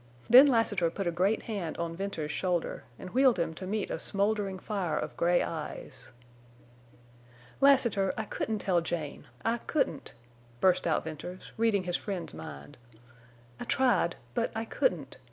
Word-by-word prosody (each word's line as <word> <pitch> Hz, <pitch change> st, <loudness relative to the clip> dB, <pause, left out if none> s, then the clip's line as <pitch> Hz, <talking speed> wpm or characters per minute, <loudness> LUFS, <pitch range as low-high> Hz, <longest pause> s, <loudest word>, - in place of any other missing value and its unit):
Then 255 Hz, +5 st, +9 dB
Lassiter 220 Hz, -9 st, +2 dB
put 195 Hz, +4 st, -4 dB
a 175 Hz, -, +1 dB
great 190 Hz, +6 st, +1 dB
hand 195 Hz, -8 st, -4 dB
on 170 Hz, 0 st, -3 dB
Venters's 170 Hz, -5 st, -3 dB
shoulder 175 Hz, 0 st, -1 dB
and 185 Hz, -, -9 dB
wheeled 260 Hz, -3 st, +4 dB
him 165 Hz, -2 st, -1 dB
to 185 Hz, +4 st, -7 dB
meet 210 Hz, +1 st, -2 dB
a -, -, -2 dB
smoldering 200 Hz, -1 st, 0 dB
fire 185 Hz, -6 st, -2 dB
of -, -, -4 dB
gray 175 Hz, +1 st, +3 dB
eyes. 150 Hz, -4 st, -6 dB, 1.5 s
"Lassiter, 235 Hz, -8 st, +4 dB
I 220 Hz, -, -1 dB
couldn't 215 Hz, +1 st, -2 dB
tell 185 Hz, -4 st, +1 dB
Jane! 160 Hz, -3 st, -4 dB, 0.2 s
I 230 Hz, +1 st, +1 dB
couldn't," 230 Hz, -, -2 dB, 0.4 s
burst 185 Hz, +2 st, +3 dB
out 160 Hz, -, +1 dB
Venters, 160 Hz, +4 st, -8 dB
reading 220 Hz, -4 st, +2 dB
his 175 Hz, -1 st, -1 dB
friend's 195 Hz, -4 st, -4 dB
mind. 75 Hz, -3 st, -9 dB, 0.8 s
"I -, -, -4 dB
tried. 260 Hz, -2 st, +2 dB, 0.2 s
But 235 Hz, -1 st, 0 dB
I 225 Hz, +1 st, -2 dB
couldn't. -, -, -1 dB
190 Hz, 155 wpm, -30 LUFS, 170-220 Hz, 1.5 s, Then